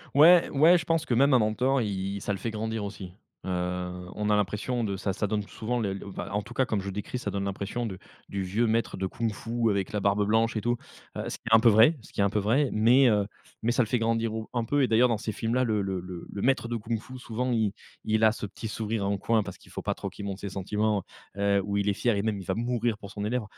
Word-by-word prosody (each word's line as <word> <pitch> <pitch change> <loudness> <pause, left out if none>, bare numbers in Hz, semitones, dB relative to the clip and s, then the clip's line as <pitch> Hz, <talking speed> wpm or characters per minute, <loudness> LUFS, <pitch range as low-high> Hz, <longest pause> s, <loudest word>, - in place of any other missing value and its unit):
Ouais, 170 +4 +7
ouais 160 +5 +6
je 170 - -3
pense 165 -1 +1
que 120 - -1
même 135 +3 +4
un 125 - +6
mentor, 125 +5 +1
il 100 -1 -2
ça 100 - -1
le - - -3
fait 115 - -3
grandir 110 0 -3
aussi. 95 -3 -7 0.3
Heu, - - -4 0.6
on 105 0 -2
a 105 - +4
l'impression 105 +5 -1
de 100 -2 -2
ça 100 0 -2
ça 105 - -1
donne 105 +1 0
souvent, 120 +2 -3
le, 100 -3 -1
l 95 - -5
enfin, 100 - -6
en 105 +1 0
tout 120 - -11
cas 130 +2 +2
comme 105 -5 -1
je 100 - -5
décris, 105 +5 -4
ça - - -4
donne 100 0 -2
l'impression 100 +5 -3
de 95 -4 -5 0.3
du 100 -1 -3
vieux 110 +6 +1
maître 115 -2 0
de 95 0 -1
Kung-fu 115 +2 -1
avec 100 0 -1
la 105 - -1
barbe 100 +1 +2
blanche 115 +1 +2
et - - -1
tout, 120 +2 +1 0.4
heu - - -2
ce - - -5
qui - - -50
est 115 - +7
un - - +7
peu 120 - +7
vrai, 115 +9 +6
ce - - -16
qui - - -8
est - - +5
un 100 - +3
peu 105 - 0
vrai. 125 +8 +2
Mais 125 +5 +5
heu, 105 -2 +2 0.4
mais 120 - +2
ça 125 - +2
le - - -5
fait 120 +1 +1
grandir 115 0 0
au 110 0 -5
un 120 -2 0
peu 145 +3 +2
et - - +3
d'ailleurs 120 +3 +5
dans 115 -3 0
ces 110 0 -4
films 115 +2 -2
là, 130 - +3
le 110 -4 +1
le 95 -2 -2
le 90 -1 -7
le - - -16
le 100 - -5
maître 130 -2 +2
de 120 - -2
Kung-fu 115 +3 -4
souvent, 125 +1 -3
il 110 -4 +1 0.3
il 110 0 +1
a 110 - +5
ce 105 - -5
petit 110 +3 -7
sourire 110 -1 -2
en 100 0 0
coin 115 +2 +2
parce 95 - -8
qu'il - - -19
faut - - -5
pas - - -1
trop - - -5
qu'il 100 - -8
montre 100 -1 -5
ses 100 - -4
sentiments. 105 +1 -1 0.3
Heu, 100 0 +2
ou 100 0 -2
il 100 0 0
est 100 - +3
fier 115 0 +1
et - - +1
même 110 -1 -1
il 95 - -8
va - - 0
mourir 120 -1 -1
pour 100 -2 -10
son 105 0 -5
élève. 120 +2 -1
110 Hz, 295 wpm, -27 LUFS, 100-120 Hz, 0.6 s, Ouais